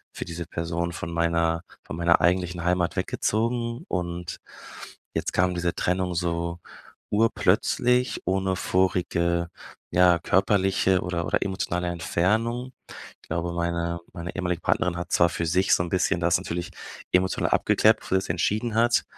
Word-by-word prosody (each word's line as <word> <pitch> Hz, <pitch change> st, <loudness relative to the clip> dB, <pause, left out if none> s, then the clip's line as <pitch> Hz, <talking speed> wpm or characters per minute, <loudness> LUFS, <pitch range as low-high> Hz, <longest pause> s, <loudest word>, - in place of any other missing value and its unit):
für -, -, -5 dB
diese 85 Hz, 0 st, -6 dB
Person 85 Hz, +1 st, -3 dB
von 85 Hz, -1 st, -5 dB
meiner 85 Hz, 0 st, +1 dB, 0.2 s
von -, -, -7 dB
meiner 85 Hz, 0 st, +3 dB
eigentlichen 90 Hz, -1 st, +1 dB
Heimat 90 Hz, 0 st, +1 dB
weggezogen 115 Hz, +2 st, -1 dB
und 85 Hz, -1 st, -4 dB, 0.8 s
jetzt -, -, -2 dB
kam 90 Hz, 0 st, +2 dB
diese 85 Hz, 0 st, -1 dB
Trennung 90 Hz, 0 st, 0 dB
so 85 Hz, 0 st, -2 dB, 0.5 s
urplötzlich 125 Hz, +3 st, +2 dB
ohne 95 Hz, 0 st, 0 dB
vorige, 85 Hz, -2 st, 0 dB, 0.4 s
ja, 90 Hz, -1 st, +5 dB
körperliche 95 Hz, +1 st, +2 dB
oder 85 Hz, -1 st, -2 dB
oder -, -, +1 dB
emotionale 90 Hz, -2 st, -2 dB
Entfernung. 110 Hz, +9 st, -1 dB, 0.5 s
Ich -, -, -22 dB
glaube, 85 Hz, +1 st, -2 dB
meine 85 Hz, 0 st, -1 dB
meine 85 Hz, -1 st, -6 dB
ehemalige 90 Hz, -2 st, -2 dB
Partnerin 90 Hz, +1 st, 0 dB
hat 85 Hz, 0 st, -6 dB
zwar 85 Hz, -, +4 dB
für 85 Hz, -, -3 dB
sich 90 Hz, +4 st, +3 dB
so -, -, 0 dB
'n 85 Hz, -, -5 dB
bisschen 90 Hz, -1 st, +1 dB
das 85 Hz, 0 st, +3 dB
natürlich 85 Hz, +1 st, -4 dB, 0.4 s
emotional 95 Hz, +1 st, +2 dB
abgeklärt, -, -, +4 dB
bevor -, -, -2 dB
sie -, -, +3 dB
das -, -, -8 dB
entschieden 105 Hz, +7 st, 0 dB
hat, 120 Hz, +1 st, +3 dB
90 Hz, 145 wpm, -25 LUFS, 85-95 Hz, 0.8 s, ja